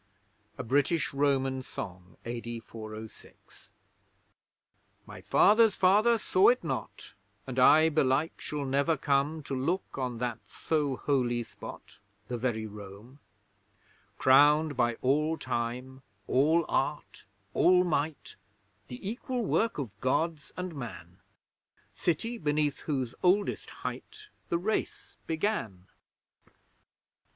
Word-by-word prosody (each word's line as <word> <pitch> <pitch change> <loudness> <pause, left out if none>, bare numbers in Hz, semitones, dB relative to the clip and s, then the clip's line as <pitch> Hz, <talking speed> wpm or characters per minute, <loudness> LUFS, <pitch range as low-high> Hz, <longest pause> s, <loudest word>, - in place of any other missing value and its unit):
A 130 - -4
BRITISH 145 +7 +1
ROMAN 135 -2 +1
SONG 90 -7 -8
(A.D. 120 0 -5
406) 110 -1 -12 1.4
My - - -11
father's 220 0 +5
father 210 +5 +4
saw 190 -2 +3
it 250 +1 +4
not, - - -5 0.3
And 130 -1 -3
I, 155 +5 +7
belike, 150 +1 +1
shall 145 -2 -4
never 140 +4 +1
come, 145 +3 0
To 140 - -6
look 140 +4 -2
on 125 -2 -2
that 120 -1 -3
so 150 -4 -1
holy 125 -4 0
spot - - -11 0.3
The 125 - -2
very 115 -3 -1
Rome 105 +5 -11 1.0
Crowned 145 +3 +5
by 120 -2 +1
all 150 +5 +2
Time, 125 +1 -4 0.2
all 155 +5 +3
Art, 145 +2 -2 0.3
all 180 +1 +5
Might, 155 -3 -2 0.5
The 125 +8 -8
equal 245 +2 -3
work 225 +3 +1
of 110 -8 -6
Gods 155 +4 -1
and 180 -1 -4
Man, 90 - -8 0.7
City 225 +8 -1
beneath 150 -1 0
whose 130 -6 -3
oldest 195 +3 +1 0.2
height 430 0 -7 0.2
The 170 - +1
Race 210 +5 -3
began! 160 - -2
140 Hz, 110 wpm, -29 LUFS, 125-165 Hz, 1.4 s, I